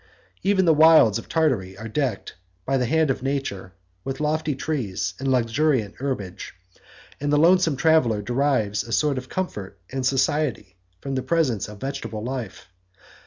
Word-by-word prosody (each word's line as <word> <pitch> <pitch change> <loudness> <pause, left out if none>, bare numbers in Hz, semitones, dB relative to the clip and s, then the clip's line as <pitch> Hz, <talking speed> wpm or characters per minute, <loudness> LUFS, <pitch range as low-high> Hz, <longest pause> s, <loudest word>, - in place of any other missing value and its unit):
Even 195 -2 +2
the 165 - +5
wilds 155 -8 +6
of - - -12
Tartary 120 - 0
are 110 +2 -7
decked, 125 -2 -2 0.3
by 135 - 0
the 125 -2 +1
hand 160 +1 +2
of 130 - -3
nature, 135 -9 -3 0.3
with 135 0 -5
lofty 155 -1 0
trees 105 -11 -3
and 135 - -3
luxuriant 125 -2 +1
herbage; 105 -13 -5 0.6
and 145 +1 -1
the 150 - +4
lonesome 170 -1 +4
traveller 140 -7 +3
derives 120 -4 0
a 115 - -6
sort 140 +4 +1
of 130 +1 -12
comfort 100 - -4
and 135 0 -3
society 130 - 0 0.3
from 135 - -4
the 130 - -1
presence 130 - 0
of 105 -1 -11
vegetable 115 -5 -5
life. 125 -5 -5
135 Hz, 160 wpm, -23 LUFS, 110-150 Hz, 0.6 s, wilds